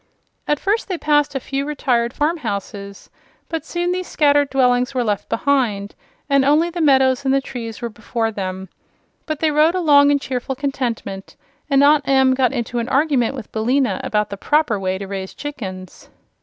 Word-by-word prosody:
As 295 - +2
first 410 - -1
they 370 -3 -3
passed 295 -2 +1
a - - 0
few 275 +2 -3
retired 255 -5 0
farm 305 +6 0
houses, 200 - -6 0.4
but 325 -1 -3
soon 350 0 -2
these 365 0 -3
scattered 290 -2 +2
dwellings 250 0 +2
were 250 - +1
left 205 -3 -2
behind 225 -7 0 0.3
and 275 -1 +3
only 305 +5 +3
the 345 0 -3
meadows 265 -3 +3
and 265 - +1
the 275 - +3
trees 235 -4 -7
were 235 - -2
before 225 +1 -3
them. 190 -2 -5 0.6
But 310 -2 -3
they 315 -1 +2
rode 305 +4 +3
along 290 -5 +5
in 290 - +4
cheerful 265 -1 -4
contentment, 245 -8 -4 0.3
and 275 0 +4
Aunt 290 -1 +4
Em 265 -1 +4
got 260 -2 +2
into 240 -2 -3
an 235 +2 -3
argument 275 -3 +1
with 245 -5 -9
Billina 235 -1 0
about 210 -1 -1
the 200 - -5
proper 290 -3 +1
way 190 0 -1
to 195 - -6
raise 190 -1 -6
chickens. 190 -11 -8
265 Hz, 185 wpm, -20 LUFS, 225-290 Hz, 0.6 s, along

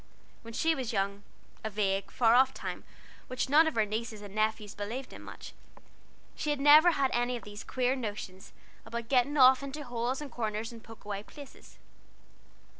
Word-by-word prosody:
When 230 0 -10
she 325 0 +2
was 260 -5 -3
young 200 -1 -1 0.4
(a 220 - -2
vague, 195 -2 -1
far 230 +2 +3
off 260 +2 +4
time, - - -6 0.4
which 255 +1 -2
none 310 +3 +6
of 315 - -2
her 220 -2 +3
nieces 215 0 -4
and 200 -1 -10
nephews 215 -1 -1
believed 235 +6 -6
in - - -10
much), - - -10 0.8
she 300 - -4
had 295 -1 0
never 305 +5 +7
had 270 -3 +1
any 245 +1 0
of - - -11
these 205 +1 -9
queer 255 0 0
notions 205 -6 -6 0.3
about 235 0 -6
getting 275 +3 +2
off 260 0 +7
into 280 +2 -6
holes 245 +1 -2
and 295 -2 -7
corners, 220 -1 -3
and 230 -1 -12
poke 225 -2 -14
away 200 -1 -4
places. 285 +5 -14
235 Hz, 185 wpm, -30 LUFS, 215-265 Hz, 0.8 s, never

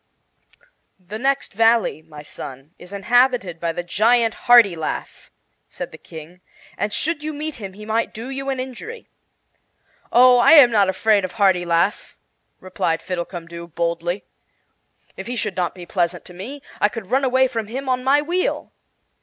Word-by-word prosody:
"The 195 +4 -8
next 275 +2 -1
valley, 225 -5 +2
my 150 -2 -12
son, 135 +1 -10
is 180 - -13
inhabited 225 -3 +1
by 170 0 -1
the 175 +1 -5
giant 225 +5 +2
Hartilaf," 200 -10 +3 0.4
said - - -7
the - - -12
King, 165 +3 -12 0.3
"and 210 - -2
should 315 +6 -2
you 310 +1 -4
meet 305 +1 -5
him 195 -4 -8
he 210 +2 -11
might 220 +1 -1
do 235 +5 -7
you 270 0 -4
an 265 -1 -2
injury." 265 - -7 1.0
"Oh, 250 0 +6
I 240 - +6
am 280 -6 +8
not 205 -4 +3
afraid 205 +2 +2
of 185 - -4
Hartilaf," 180 -2 +1 0.4
replied 170 -3 -2
Fiddlecumdoo, 170 -1 -6
boldly. 170 +2 -2 0.9
"If - - -7
he 245 - -4
should 210 -4 -2
not 180 -1 -2
be 180 -1 -9
pleasant 175 -1 -2
to 180 - -11
me, 255 +11 -8 0.2
I 210 - +3
could 215 -4 -8
run 265 +2 +2
away 260 0 +3
from 225 -4 -4
him 265 +5 -6
on 255 -1 0
my 285 +3 +3
wheel." 355 +4 -2
210 Hz, 160 wpm, -21 LUFS, 175-255 Hz, 1.0 s, am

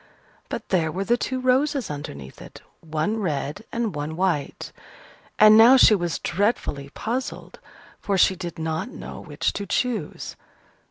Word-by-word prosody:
But - - -6
there 165 -4 +1
were 190 +5 -2
the 235 +4 +2
two 255 +1 -3
roses 260 - +1
underneath 70 - -8
it, - - -12 0.2
one 160 +7 -2
red 155 0 -3
and 230 -3 -2
one 150 +1 -4
white. 175 -5 -2 0.7
And 215 0 +8
now 235 +4 +8
she 235 - +7
was 175 -4 0
dreadfully 170 - -1
puzzled, 245 - -5 0.4
for 200 -2 -1
she 190 +1 +4
did 175 -2 -7
not 160 +6 -3
know - - -9
which - - -2
to 200 - -5
choose. 245 +5 -2
190 Hz, 150 wpm, -24 LUFS, 160-230 Hz, 0.7 s, And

